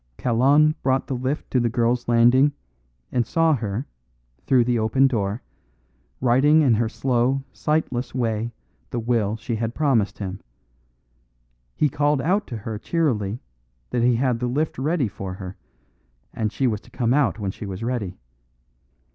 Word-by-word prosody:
Kalon 140 +6 +4
brought 130 0 +1
the - - -4
lift 130 +4 -3
to 130 - +3
the 120 -1 +1
girl's 120 +1 0
landing, 120 +5 +5 0.6
and 120 - +2
saw 165 +6 +2
her, 115 -1 -2 0.6
through 130 -3 +5
the 120 -1 +1
open 110 +5 +3
door, 110 -4 -1 0.8
writing 140 +5 +4
in 130 -5 +4
her 110 +1 +1
slow, 130 +2 0
sightless 145 -6 -1
way 115 -2 -1 0.4
the - - -4
will 115 -3 0
she 115 +1 -3
had 115 +1 -3
promised 130 -9 +1
him. 95 -1 -5 1.4
He 150 - +3
called 145 +1 +1
out 195 +9 +1
to 120 - -5
her 105 0 -5
cheerily 115 - -1 0.5
that 120 - 0
he 120 0 +4
had 125 -1 +1
the 125 - -1
lift 145 +5 -1
ready 150 -1 +1
for 95 -2 -6
her, 95 -1 -8 0.8
and 110 -2 -2
she 135 - -1
was 110 -5 0
to - - -19
come 120 0 0
out 145 -5 +2
when 100 -3 -3
she 100 - -8
was 95 +2 -6
ready. 115 -7 -3
120 Hz, 160 wpm, -23 LUFS, 110-135 Hz, 1.4 s, landing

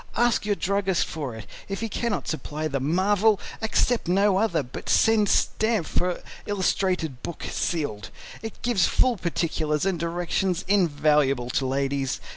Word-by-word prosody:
Ask 240 -3 +2
your 205 - +2
druggist 195 -2 0
for 140 -7 -5
it. 110 - -9 0.2
If 195 +1 -3
he 225 - -1
cannot 225 +1 -2
supply 155 0 -3
the 140 -2 -2
MARVEL, 195 +8 +2 0.2
accept 225 +1 +1
no 195 +2 +3
other, 185 -8 +1
but 125 - -8
send 220 -2 +4
stamp 220 -5 +1
for 180 +2 -1 0.2
illustrated 185 -8 0
book 170 - -6
sealed. 145 - -2 0.3
It 225 -1 -8
gives 235 -8 +3
full 255 -2 +2
particulars 165 -4 -1
and 190 -3 0
directions 175 +2 -1
invaluable 150 -9 +2
to 130 - 0
ladies. 135 0 -1
175 Hz, 145 wpm, -25 LUFS, 150-205 Hz, 0.3 s, send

